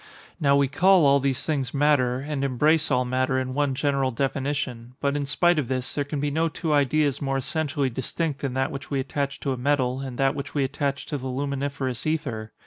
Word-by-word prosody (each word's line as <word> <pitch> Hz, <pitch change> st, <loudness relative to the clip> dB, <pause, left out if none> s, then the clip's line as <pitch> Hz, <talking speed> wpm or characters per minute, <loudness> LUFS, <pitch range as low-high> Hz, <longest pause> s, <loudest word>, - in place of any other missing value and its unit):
Now 140 Hz, -3 st, +4 dB
we 140 Hz, -1 st, +3 dB
call 185 Hz, +4 st, +4 dB
all 140 Hz, 0 st, +5 dB
these 135 Hz, -1 st, -1 dB
things 140 Hz, -4 st, -1 dB
matter, 135 Hz, -3 st, +2 dB
and 145 Hz, -1 st, -3 dB
embrace 150 Hz, +4 st, +2 dB
all 125 Hz, 0 st, +2 dB
matter 130 Hz, +1 st, 0 dB
in 130 Hz, 0 st, -2 dB
one 140 Hz, -1 st, 0 dB
general 140 Hz, -1 st, +1 dB
definition; 130 Hz, -2 st, -2 dB
but 140 Hz, 0 st, 0 dB
in 145 Hz, -1 st, -2 dB
spite 170 Hz, +3 st, +3 dB
of 135 Hz, -, -2 dB
this, 130 Hz, 0 st, -2 dB
there 145 Hz, -, 0 dB
can 145 Hz, +1 st, -4 dB
be 145 Hz, +1 st, -1 dB
no 165 Hz, +3 st, +1 dB
two 160 Hz, 0 st, -2 dB
ideas 145 Hz, 0 st, +2 dB
more 135 Hz, -1 st, 0 dB
essentially 140 Hz, 0 st, -1 dB
distinct 140 Hz, +4 st, -3 dB
than 135 Hz, -2 st, -2 dB
that 130 Hz, +1 st, 0 dB
which 140 Hz, -, -7 dB
we 140 Hz, -, 0 dB
attach 140 Hz, +1 st, -2 dB
to 135 Hz, -, -1 dB
a -, -, -5 dB
metal, 130 Hz, -1 st, +1 dB
and 130 Hz, -3 st, -6 dB
that 135 Hz, 0 st, +2 dB
which 145 Hz, 0 st, -6 dB
we 140 Hz, -, +2 dB
attach 140 Hz, +1 st, -2 dB
to 145 Hz, -, -4 dB
the 130 Hz, -, -5 dB
luminiferous 140 Hz, -1 st, -2 dB
ether. 115 Hz, -9 st, -2 dB
140 Hz, 220 wpm, -25 LUFS, 130-145 Hz, -, all